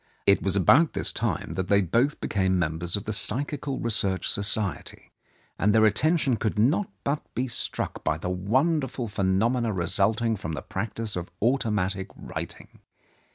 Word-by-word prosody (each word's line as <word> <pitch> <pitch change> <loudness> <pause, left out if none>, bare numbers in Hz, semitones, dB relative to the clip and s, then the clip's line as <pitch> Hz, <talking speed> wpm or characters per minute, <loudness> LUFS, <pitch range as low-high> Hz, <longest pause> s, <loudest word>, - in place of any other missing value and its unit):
It 100 - +5
was 95 -1 +1
about 130 - +5
this - - -1
time - - -2
that 95 -1 -2
they 100 - +4
both 120 - +1
became 95 -2 +1
mem 80 -2 -1
bers 85 0 -1
of 100 - -4
the 110 - -2
Psychical 140 +5 -1
Research 100 -5 0
Society, 100 -1 -2 0.5
and 105 +2 +3
their 110 0 +6
attention 135 - +2
could 110 -1 -2
not 145 - +2
but 145 +2 -1
be 130 +2 0
struck 120 - -4
by 75 - 0
the 85 - -5
wonderful 130 - 0
phenomena 110 +4 +1
resulting 105 +5 +1
from 80 -4 -5
the 75 - -5
practice 110 +2 -4
of 90 0 -4
automatic 105 -6 0
writing. - - -8
105 Hz, 155 wpm, -26 LUFS, 95-125 Hz, 0.5 s, their